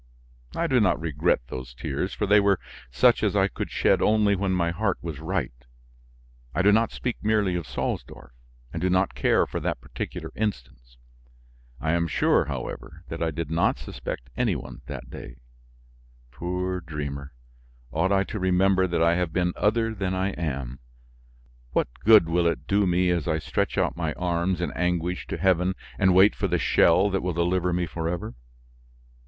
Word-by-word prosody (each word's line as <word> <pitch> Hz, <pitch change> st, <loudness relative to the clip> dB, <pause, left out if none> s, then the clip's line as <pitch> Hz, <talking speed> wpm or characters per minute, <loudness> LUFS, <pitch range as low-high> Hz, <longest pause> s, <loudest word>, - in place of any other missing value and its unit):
I 170 Hz, -, 0 dB
do 130 Hz, -6 st, +3 dB
not 105 Hz, -5 st, +2 dB
regret 80 Hz, -1 st, +1 dB
those 65 Hz, -1 st, -7 dB
tears 70 Hz, +10 st, -3 dB
for 105 Hz, -, -2 dB
they 105 Hz, +1 st, +5 dB
were 100 Hz, -2 st, +3 dB, 0.3 s
such 60 Hz, +1 st, +4 dB
as -, -, +1 dB
I -, -, +4 dB
could -, -, -5 dB
shed -, -, +2 dB
only 105 Hz, -1 st, +3 dB
when 95 Hz, 0 st, -1 dB
my 85 Hz, -2 st, +1 dB
heart 100 Hz, +3 st, -1 dB
was 80 Hz, -4 st, -5 dB
right; 80 Hz, -4 st, -2 dB, 1.0 s
I 90 Hz, -, +2 dB
do 105 Hz, -, +6 dB
not 115 Hz, +2 st, +3 dB
speak 125 Hz, -2 st, -3 dB
merely 105 Hz, -3 st, +2 dB
of 85 Hz, -5 st, -3 dB
Salsdorf, 65 Hz, -, -4 dB, 0.4 s
and 80 Hz, -, -4 dB
do 95 Hz, -, +1 dB
not 95 Hz, +1 st, +2 dB
care -, -, +2 dB
for -, -, -4 dB
that -, -, -2 dB
particular -, -, -6 dB
instance. -, -, -5 dB, 0.8 s
I 80 Hz, -, -1 dB
am 85 Hz, 0 st, +1 dB
sure, 75 Hz, -, +2 dB
however, -, -, -6 dB
that -, -, -6 dB
I 85 Hz, -, +1 dB
did 80 Hz, 0 st, -4 dB
not 85 Hz, +1 st, +2 dB
suspect 65 Hz, +1 st, -7 dB
any -, -, +1 dB
one -, -, -8 dB
that -, -, -7 dB
day. -, -, -9 dB, 1.0 s
Poor 90 Hz, +7 st, -3 dB
dreamer! 70 Hz, -3 st, -6 dB, 0.6 s
Ought 85 Hz, +5 st, +1 dB
I 100 Hz, -1 st, +3 dB
to 100 Hz, +3 st, -5 dB
remember 95 Hz, 0 st, +3 dB
that 85 Hz, -2 st, +1 dB
I 85 Hz, 0 st, +4 dB
have 90 Hz, -2 st, -1 dB
been 90 Hz, +1 st, 0 dB
other 115 Hz, +1 st, +1 dB
than 95 Hz, -3 st, -2 dB
I 95 Hz, +1 st, 0 dB
am? 65 Hz, -7 st, -4 dB, 0.9 s
What -, -, +2 dB
good 110 Hz, -6 st, +6 dB
will 85 Hz, +1 st, +2 dB
it 85 Hz, -, -2 dB
do 100 Hz, 0 st, +2 dB
me 90 Hz, 0 st, +2 dB
as 85 Hz, -3 st, -1 dB
I 80 Hz, -2 st, +1 dB
stretch 80 Hz, -, -2 dB
out -, -, +1 dB
my 80 Hz, -3 st, -2 dB
arms 90 Hz, 0 st, -1 dB
in 90 Hz, -, -1 dB
anguish 90 Hz, 0 st, -1 dB
to -, -, -4 dB
heaven 95 Hz, 0 st, +2 dB, 0.2 s
and 95 Hz, -3 st, +4 dB
wait 95 Hz, +3 st, +7 dB
for -, -, -1 dB
the -, -, +1 dB
shell 95 Hz, +4 st, +4 dB
that 95 Hz, -, 0 dB
will 90 Hz, -1 st, -2 dB
deliver 90 Hz, +2 st, +1 dB
me 90 Hz, 0 st, 0 dB
forever. 85 Hz, +6 st, -4 dB
90 Hz, 180 wpm, -25 LUFS, 80-95 Hz, 1.0 s, wait